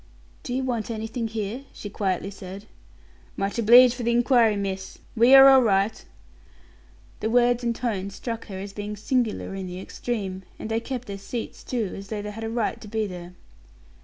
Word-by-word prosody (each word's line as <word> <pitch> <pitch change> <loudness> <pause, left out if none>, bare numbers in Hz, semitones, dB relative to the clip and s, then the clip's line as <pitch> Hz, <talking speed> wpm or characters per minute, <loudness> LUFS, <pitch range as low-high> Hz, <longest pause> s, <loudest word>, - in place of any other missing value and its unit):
"Do 245 - -4
you 265 - -1
want 240 -4 -2
anything 225 +1 -3
here?" 220 +4 -4
she - - -8
quietly 195 -1 -2
said. 195 +1 -9 0.7
"Much 195 +3 -2
obleeged 240 +2 +8
for 250 - -7
the 235 - 0
inquiry, 235 -2 +4
miss. 195 -1 -4 0.2
We 240 +4 +7
are 270 0 +10
all 265 -1 +8
right." 200 -2 +1 1.2
The 220 - -1
words 245 +1 +3
and 235 -1 0
tone 205 -6 -2
struck 230 +3 -6
her 195 -3 -7
as 195 +1 -7
being 210 0 -5
singular 220 -1 -1
in 190 -1 -5
the 180 0 -6
extreme; 195 -2 -4 0.2
and 220 - -6
they 225 - +1
kept 250 +1 -5
their 200 -3 -7
seats, 230 +4 -6
too, 230 -6 -2
as 195 0 -8
though 210 0 -4
they 210 - -5
had 225 +2 -7
a 225 - -3
right 230 -1 -2
to 215 - -10
be 220 +1 -1
there. 180 -2 -8
220 Hz, 190 wpm, -25 LUFS, 195-240 Hz, 1.2 s, are